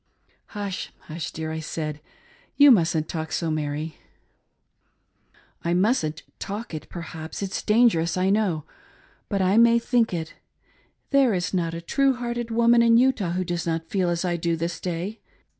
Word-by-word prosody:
" - - -39
Hush! 200 -2 -4
Hush, 160 0 -6
dear," 160 0 -5
I 160 - -3
said, 155 -1 -4 0.6
".You 285 -1 +8
mustn't 165 -7 +3
talk 160 -1 -4
so, 165 -2 -1
Mary! 155 +1 -3 0.9
" - - -36
"I 170 +1 +1
mustn't 180 - +1 0.2
ifllk 205 +1 -5
it 155 - -6
perhaps 160 -2 -7
rit's 195 - -3
dangerous, 210 -7 +3
I 185 +1 +2
know; 195 -7 +1 0.3
— - - -33
but 195 -2 0
I 185 - +2
ALL 205 - +3
lostI^ - - +8
jgg, - - +8
may 235 0 +6
think 235 -1 +1
it. 160 -1 -5 0.8
There 270 -6 +4
is 180 +1 -2
not 165 -3 -1
a 165 - -5
true 275 +9 +2
hearted 240 -1 -3
woman 235 +1 +4
in 230 0 +5
Utah 235 -9 +2
who 185 +1 0
does 175 -1 -3
not 165 0 -2
feel 185 -3 +1
as 170 +1 -1
I 175 -1 0
do 170 0 0
this 165 +1 -3
day. 180 +5 -4
180 Hz, 185 wpm, -24 LUFS, 165-225 Hz, 0.9 s, You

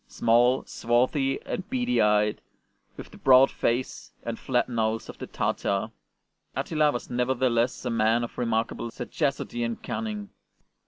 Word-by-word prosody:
Small, 120 +3 +3
swarthy, 130 +4 +1
and 185 - -5
beady 250 -1 +1
eyed, 105 0 +2 0.6
with - - -9
the - - -14
broad 130 0 +6
face 120 +2 -2
and 115 -1 -4
flat 125 -2 0
nose 115 -2 -1
of - - -10
the - - -6
Tartar, 100 +2 -1 0.6
Attila 155 -2 +1
was 120 - -6
nevertheless 125 -1 0
a - - -1
man 115 +1 +2
of 120 - -6
remarkable 115 0 -1
sagacity 135 +1 -3
and 115 -1 -4
cunning. 210 -2 -4
120 Hz, 140 wpm, -26 LUFS, 115-135 Hz, 0.6 s, broad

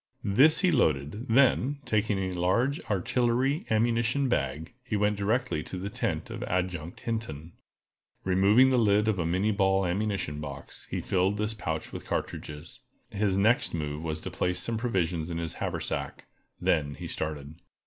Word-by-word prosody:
This 135 - +5
he 185 -2 +4
loaded; 80 - +1
then, 135 +3 +4
taking 105 -1 +1
a 95 -1 -2
large 115 - +1
artillery 125 - 0
ammunition 115 +4 +2
bag, 75 - -2
he 120 -4 -3
went 105 +1 +2
directly 110 -1 0
to 95 - -6
the 100 +2 -5
tent - - -2
of - - -6
Adjutant 90 -2 -3
Hinton. 100 -9 -4 0.7
Removing 100 +8 +5
the 125 - +4
lid 105 -1 +3
of 105 -4 +1
a 85 - 0
minnié 95 +5 +1
ball 95 -1 +2
ammunition 95 -5 -1
box, 70 -2 -8
he - - -2
filled 95 +2 +1
this 105 +1 -1
pouch 80 -7 -4
with - - -7
cartridges. 75 +2 -5 0.3
His 100 -2 +1
next 110 -1 +2
move 75 -1 -3
was 80 -1 -3
to - - -6
place 90 0 -1
some 115 - -1
provision 90 -8 -1
in 85 - -3
his 85 -1 -3
haversack; - - -3 0.3
then 70 -2 +1
he - - -8
started. 75 0 -5
100 Hz, 160 wpm, -28 LUFS, 85-115 Hz, 0.7 s, This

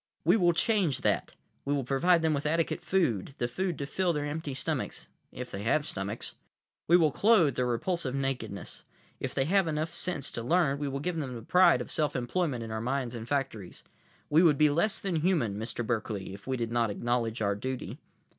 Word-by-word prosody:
"We 175 +5 +6
will 175 -5 +4
change 185 - +2
that. - - 0 0.3
We 145 +1 0
will 140 - -1
provide 165 +7 +3
them 160 -1 +3
with 145 +1 -1
adequate 165 +1 0
food, 135 - 0
the 120 - 0
food 180 +5 -2
to 140 - -3
fill 175 +4 0
their 145 -1 -2
empty 145 -2 -4
stomachs—if 125 -1 -5
they 100 - -5
have 135 +7 +1
stomachs. 100 0 -4 0.5
We 175 - +7
will 160 -4 +3
clothe 190 - +4
their 125 -1 0
repulsive 135 +3 -1
nakedness. 125 -8 -4 0.4
If - - -4
they 135 - +2
have 190 +2 +3
enough 155 +1 -2
sense 175 -7 -2
to 115 - -4
learn, 140 +2 +2
we 145 - -2
will 140 0 -3
give 175 +1 -2
them 135 -5 -3
the 115 - -8
pride 180 -4 +5
of - - -6
self 150 -2 0
employment 130 0 -1
in 110 - -7
our 110 0 -3
mines 130 0 -2
and 115 -1 -6
factories. 130 -9 -3 0.4
We 155 +3 +5
would 160 -5 +5
be 150 0 +5
less 170 +8 +1
than 185 -4 -1
human, 155 - +1
Mr. 115 +2 -4
Berkeley, 110 -5 -3
if 100 +4 -12
we 130 -1 -1
did 115 -1 -3
not 120 -1 +1
acknowledge 115 +2 -1
our 100 -2 +1
duty." 130 +5 -5
140 Hz, 205 wpm, -29 LUFS, 120-165 Hz, 0.5 s, We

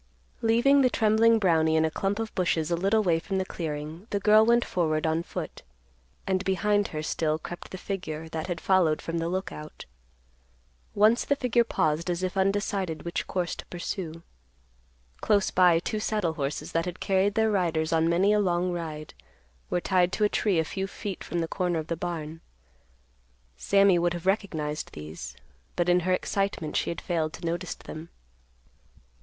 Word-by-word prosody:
Leaving 240 +5 +4
the 255 - +4
trembling 225 0 +4
Brownie 160 -6 +3
in 160 0 +3
a 160 - -1
clump 195 +4 -1
of 225 -1 -4
bushes 170 -3 0
a - - +3
little 200 +5 +2
way 170 -4 +2
from 195 +3 -3
the 190 - 0
clearing, 160 +2 -5
the 200 - -1
girl 215 +2 +6
went 235 +1 +3
forward 155 -3 0
on 160 +1 +1
foot, - - -6 0.6
and 190 0 0
behind 205 +1 +1
her 155 -1 -5
still 155 0 0
crept 175 +2 -8
the 185 - -7
figure 165 -5 -5
that 160 0 -4
had 175 -3 -3
followed 175 -5 +3
from 165 0 -3
the 165 +1 -1
Lookout. 175 -4 -5 1.1
Once 215 +4 +4
the 285 - +1
figure 250 -3 +2
paused 165 -5 0
as 175 +1 -1
if 185 +1 -2
undecided 195 -4 0
which 170 - -3
course 180 -2 -2
to - - -8
pursue. 170 -2 -5 0.9
Close 205 -2 +2
by, 180 -2 +5
two 210 +5 -2
saddle 210 -6 -1
horses 140 -2 -4
that 165 0 0
had 180 0 -5
carried 195 +1 +1
their 220 -1 +3
riders 165 -5 0
on 165 0 +3
many 190 +5 +3
a 210 - +3
long 180 -2 +1
ride 155 -3 -5 0.6
were 180 - +1
tied 180 -1 +2
to 215 - 0
a 210 - +4
tree 205 -4 +1
a 160 - +2
few 190 +4 -3
feet 195 0 -6
from 170 - -2
the 165 - -2
corner 180 -1 -1
of 160 - -3
the 170 - 0
barn. 165 -2 -5 1.1
Sammy 195 - +4
would 175 0 +1
have 175 - -7
recognized 160 -7 -1
these, 75 +2 -8 0.4
but 175 -1 0
in 180 0 +4
her 180 +1 -1
excitement 195 -4 -1
she - - 0
had 170 - -3
failed 160 -3 -1
to - - -8
notice 170 +1 -2
them. 160 +2 -9
175 Hz, 185 wpm, -27 LUFS, 160-200 Hz, 1.1 s, girl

